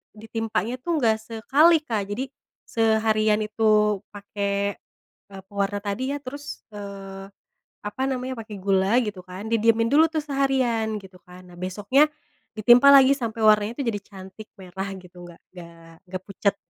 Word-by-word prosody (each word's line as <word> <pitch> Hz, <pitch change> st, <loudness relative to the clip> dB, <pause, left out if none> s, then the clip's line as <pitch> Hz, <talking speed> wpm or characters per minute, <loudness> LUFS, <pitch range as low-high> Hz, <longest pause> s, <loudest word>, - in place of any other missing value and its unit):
ditimpanya 225 Hz, 0 st, -3 dB
tuh 345 Hz, -, -2 dB
nggak 225 Hz, -3 st, +3 dB
sekali 275 Hz, +9 st, +4 dB
Kak. 220 Hz, -8 st, -2 dB
Jadi 205 Hz, +6 st, -3 dB, 0.4 s
seharian 220 Hz, -1 st, +2 dB
itu 210 Hz, -1 st, +2 dB, 0.2 s
pake 200 Hz, 0 st, -3 dB, 0.5 s
e -, -, -9 dB
pewarna 200 Hz, 0 st, -2 dB
tadi 255 Hz, +7 st, -2 dB
ya, -, -, -2 dB
terus, 285 Hz, +3 st, -8 dB
eee, 195 Hz, -1 st, -8 dB, 0.6 s
apa 205 Hz, +5 st, -6 dB
namanya, 255 Hz, 0 st, -3 dB
pake 210 Hz, -2 st, -9 dB
gula 195 Hz, +3 st, +2 dB
gitu 205 Hz, -3 st, -6 dB
kan. 185 Hz, +3 st, -9 dB
Didiemin 230 Hz, 0 st, +3 dB
dulu 315 Hz, +2 st, +6 dB
tuh 320 Hz, -, -1 dB
seharian, 260 Hz, -6 st, 0 dB
gitu 190 Hz, -2 st, -15 dB
kan. 180 Hz, 0 st, -14 dB
Nah 175 Hz, -, -15 dB
besoknya 205 Hz, +11 st, +2 dB, 0.5 s
ditimpa 240 Hz, +5 st, +6 dB
lagi 275 Hz, 0 st, +7 dB
sampai 230 Hz, -4 st, -5 dB
warnanya 210 Hz, +1 st, +4 dB
itu 280 Hz, -, 0 dB
jadi 205 Hz, -2 st, -3 dB
cantik 195 Hz, +2 st, -12 dB
merah 190 Hz, +1 st, -6 dB
gitu, 180 Hz, -1 st, -14 dB
nggak 170 Hz, -1 st, -14 dB
nggak 170 Hz, -2 st, -13 dB, 0.2 s
nggak 185 Hz, 0 st, -6 dB
pucat. 200 Hz, +1 st, -1 dB
215 Hz, 150 wpm, -24 LUFS, 195-235 Hz, 0.6 s, lagi